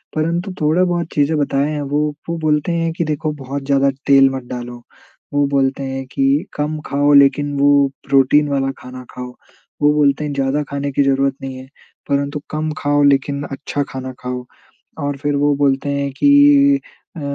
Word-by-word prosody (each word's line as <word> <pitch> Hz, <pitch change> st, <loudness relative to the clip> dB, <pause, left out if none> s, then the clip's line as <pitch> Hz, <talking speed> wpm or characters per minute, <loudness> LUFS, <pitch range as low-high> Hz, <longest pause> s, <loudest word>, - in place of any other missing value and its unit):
परंतु 170 Hz, +5 st, -1 dB
थोड़ा 160 Hz, +5 st, +3 dB
बहुत 175 Hz, -2 st, -1 dB
चीज़ें 150 Hz, +2 st, +1 dB
बताए 140 Hz, 0 st, 0 dB
हैं 150 Hz, -1 st, -3 dB
वो। 145 Hz, +1 st, -1 dB, 0.3 s
वो 170 Hz, -, -2 dB
बोलते 155 Hz, +1 st, 0 dB
हैं 165 Hz, -1 st, 0 dB
कि -, -, 0 dB
देखो 155 Hz, 0 st, -2 dB
बहुत 135 Hz, +1 st, -5 dB
ज़्यादा 140 Hz, 0 st, +2 dB, 0.2 s
तेल 135 Hz, -1 st, +6 dB
मत 135 Hz, -1 st, -5 dB
डालो, 120 Hz, -1 st, -7 dB, 0.5 s
वो 145 Hz, 0 st, +2 dB
बोलते 135 Hz, -1 st, 0 dB
हैं 135 Hz, 0 st, -4 dB
कि 140 Hz, +6 st, +1 dB
कम 150 Hz, +1 st, -3 dB
खाओ 145 Hz, +1 st, +1 dB
लेकिन 145 Hz, +1 st, +4 dB
वो 140 Hz, 0 st, +4 dB, 0.2 s
प्रोटीन 140 Hz, +2 st, +4 dB
वाला 135 Hz, -1 st, 0 dB
खाना 125 Hz, 0 st, -10 dB
खाओ। 125 Hz, 0 st, -7 dB, 0.5 s
वो 150 Hz, 0 st, +4 dB
बोलते 150 Hz, 0 st, +2 dB
हैं 145 Hz, -, -3 dB
ज़्यादा 140 Hz, +2 st, 0 dB
खाने 140 Hz, 0 st, -3 dB
की 140 Hz, -, +2 dB
ज़रूरत 135 Hz, 0 st, +1 dB
नहीं 135 Hz, -1 st, -6 dB
है, 130 Hz, -, -11 dB, 0.4 s
परंतु 140 Hz, +1 st, -1 dB
कम 155 Hz, 0 st, -2 dB
खाओ 145 Hz, 0 st, +1 dB
लेकिन 140 Hz, 0 st, +2 dB
अच्छा 140 Hz, +1 st, -3 dB
खाना 130 Hz, 0 st, -6 dB
खाओ। 125 Hz, 0 st, -5 dB, 0.6 s
और 145 Hz, 0 st, -2 dB
फिर 145 Hz, 0 st, -1 dB
वो 145 Hz, 0 st, +2 dB
बोलते 140 Hz, 0 st, +1 dB
हैं 140 Hz, 0 st, -2 dB
कि 285 Hz, -1 st, +5 dB, 0.4 s
अ, 160 Hz, -, -6 dB
140 Hz, 180 wpm, -18 LUFS, 135-150 Hz, 0.6 s, तेल